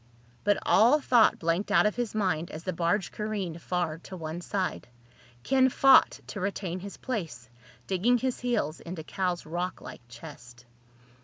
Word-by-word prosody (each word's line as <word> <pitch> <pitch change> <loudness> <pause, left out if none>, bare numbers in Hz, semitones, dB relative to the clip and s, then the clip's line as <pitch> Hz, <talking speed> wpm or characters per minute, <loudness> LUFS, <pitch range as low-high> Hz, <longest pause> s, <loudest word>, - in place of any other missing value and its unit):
But 205 0 +3
all 240 +9 +5
thought 245 -5 +4
blanked 170 +5 -1
out 200 - +5
of 210 - +1
his 240 -3 -3
mind 180 -6 0
as 155 - -8
the 185 - -3
barge 175 +3 0
careened 200 -6 -4
far 175 -3 -2
to 185 +2 -10
one 160 +1 -5
side. 185 -7 -3 0.6
Ken 260 -1 +3
fought 270 +1 +5
to 205 - -7
retain 185 -2 -3
his 200 +2 -9
place, 160 - -5 0.3
digging 205 +7 +2
his 255 +1 -2
heels 225 -11 -1
into 170 -1 -7
Cal's 180 +1 -2
rocklike 175 +3 -5
chest. 120 -1 -12
185 Hz, 155 wpm, -28 LUFS, 165-215 Hz, 0.6 s, all